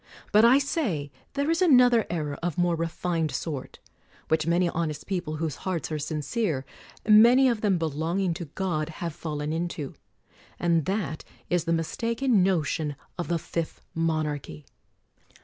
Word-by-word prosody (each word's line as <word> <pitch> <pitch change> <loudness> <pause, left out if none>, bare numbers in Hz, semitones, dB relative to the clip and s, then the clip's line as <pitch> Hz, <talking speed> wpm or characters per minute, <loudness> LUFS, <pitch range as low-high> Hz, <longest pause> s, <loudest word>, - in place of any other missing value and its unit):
But, 215 +1 +6
I 240 +3 +7
say, 220 - -1 0.2
there 285 +3 0
is 330 - +1
another 250 - +5
error 155 -4 -2
of 170 -3 -2
more 175 -1 +2
refined 165 0 -1
sort, 140 0 -5 0.5
which 160 0 +1
many 175 +1 +3
honest 160 -3 -2
people 175 -5 -3
whose 155 -2 -3
hearts 180 -4 -3
are 155 - -1
sincere, 155 - -2 0.4
many 235 +5 +7
of 235 -4 +1
them 200 -4 +2
belong 160 +3 -1
ing 185 -3 +1
to 170 - -6
God, 155 -1 -2
have 165 0 -5
fallen 150 -1 -4
into; 165 -4 -3 0.6
and 170 -3 +2
that 190 -5 -2 0.3
is 175 -2 +2
the 165 - 0
mis 165 -1 -1
taken 230 -1 +2
notion 160 -5 0 0.2
of 175 - -2
the 170 - +1
Fifth 165 0 -4
Monarchy. 155 - -2
170 Hz, 155 wpm, -27 LUFS, 155-200 Hz, 0.6 s, I